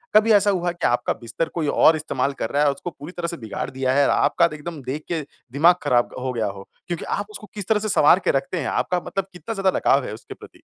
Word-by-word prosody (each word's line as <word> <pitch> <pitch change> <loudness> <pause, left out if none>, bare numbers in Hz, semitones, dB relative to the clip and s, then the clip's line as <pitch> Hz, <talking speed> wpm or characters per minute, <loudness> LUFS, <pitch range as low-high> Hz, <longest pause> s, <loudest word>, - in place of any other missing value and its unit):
कभी 220 +1 +6
ऐसा 205 0 +4
हुआ 175 -2 0
कि 175 0 -1
आपका 120 0 +1
बिस्तर 140 +8 -3
कोई 160 -3 -1
और 160 +2 +5
इस्तेमाल 140 -3 -2
कर 115 - -2
रहा 145 - +1
है 150 - +4
और 140 - +3
उसको 175 - -6
पूरी 155 0 -10
तरह 170 -1 -2
से 170 0 -5
बिगाड़ 110 +2 -5
दिया 130 -1 -1
है 140 +1 +4
और - - +2
आपका 170 - +3
द 160 - -9
एकदम 155 0 -7
देख 135 +5 -4
के 165 -2 0 0.3
दिमाग 165 +7 +5
ख़राब 120 -1 +3
ग - - -6
हो 130 0 -2
गया 115 -2 -1
हो। 100 0 -8 0.2
क्योंकि 175 -1 -4
आप 205 - -2
उसको 215 0 -9
किस 205 -3 -6
तरह 220 -1 +3
से 215 +1 -3
सवार 175 -1 +5
के - - +4
रखते 180 +6 -1
हैं? 135 - -2
आपका 180 - 0
मतलब 195 -1 -3
कितना 175 +5 -6
ज़्यादा 195 -2 +1
लगाव 140 0 +3
है - - -5
उसके 110 - -10
प्रति? - - -16
155 Hz, 280 wpm, -22 LUFS, 135-180 Hz, 0.3 s, कभी